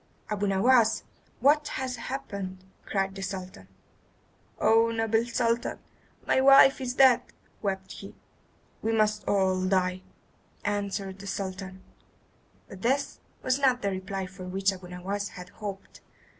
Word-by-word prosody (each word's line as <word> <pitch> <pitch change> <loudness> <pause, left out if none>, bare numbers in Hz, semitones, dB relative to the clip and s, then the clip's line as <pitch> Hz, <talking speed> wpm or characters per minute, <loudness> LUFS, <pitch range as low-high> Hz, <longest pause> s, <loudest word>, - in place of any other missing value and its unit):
"Abu 205 -1 0
Nowas! 225 +3 +4 0.4
What 295 +3 +4
has 260 -1 -3
happened?" 195 -8 -6 0.2
cried 195 -1 -1
the 195 - -7
Sultan. 185 - -6 0.9
"Oh, 225 +1 +4
noble 225 0 +1
Sultan, 235 -1 0 0.5
my 260 - +3
wife 275 0 +7
is 250 -1 -3
dead," 260 -3 +6 0.4
wept 190 -2 -3
he. 195 - -10 0.7
"We 225 - 0
must 215 -1 +2
all 190 -2 +2
die," 185 -1 +1 0.6
answered 200 -2 -2
the 200 - -9
Sultan; 190 -1 -5 0.8
but 190 - -11
this 270 +5 0 0.2
was 255 +1 +1
not 255 -4 +2
the 200 - +1
reply 190 0 -4
for 185 0 -10
which 195 +2 0
Abu 185 -1 -10
Nowas 195 +3 -4
had 180 0 -9
hoped. 200 -1 -8
200 Hz, 130 wpm, -28 LUFS, 190-230 Hz, 0.9 s, wife